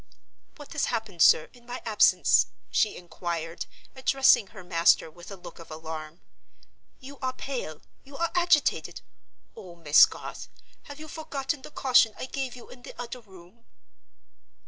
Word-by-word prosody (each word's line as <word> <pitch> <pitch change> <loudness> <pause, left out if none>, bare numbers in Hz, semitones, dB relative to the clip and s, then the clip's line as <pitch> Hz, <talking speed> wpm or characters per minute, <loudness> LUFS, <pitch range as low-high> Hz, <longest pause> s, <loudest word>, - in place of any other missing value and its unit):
"What 290 -2 -13
has 310 - 0
happened, 220 -7 -4
sir, 155 - +6
in 245 -1 -20
my 245 +1 -5
absence?" 215 -2 +4 0.2
she 215 - +1
inquired, 170 -2 -5 0.3
addressing 260 -5 +4
her 190 -2 -12
master 170 -2 +3
with 175 +2 -13
a 200 - -7
look 180 - -12
of 165 - -12
alarm. 155 +1 -8 0.8
"You 275 +1 -12
are 260 -1 -2
pale; 240 - -6 0.2
you 275 0 -12
are 335 0 -1
agitated! 345 -4 +2 0.5
Oh, 180 -3 -11
Miss 155 -3 +6
Garth, - - -9 0.4
have 285 +1 -10
you 310 - -9
forgotten 295 -2 -4
the - - -10
caution 250 -6 +3
I - - -5
gave 265 -1 -4
you 245 - -13
in 250 - -14
the - - -12
other 245 +1 -6
room?" 190 +1 -18
230 Hz, 155 wpm, -27 LUFS, 170-270 Hz, 0.8 s, sir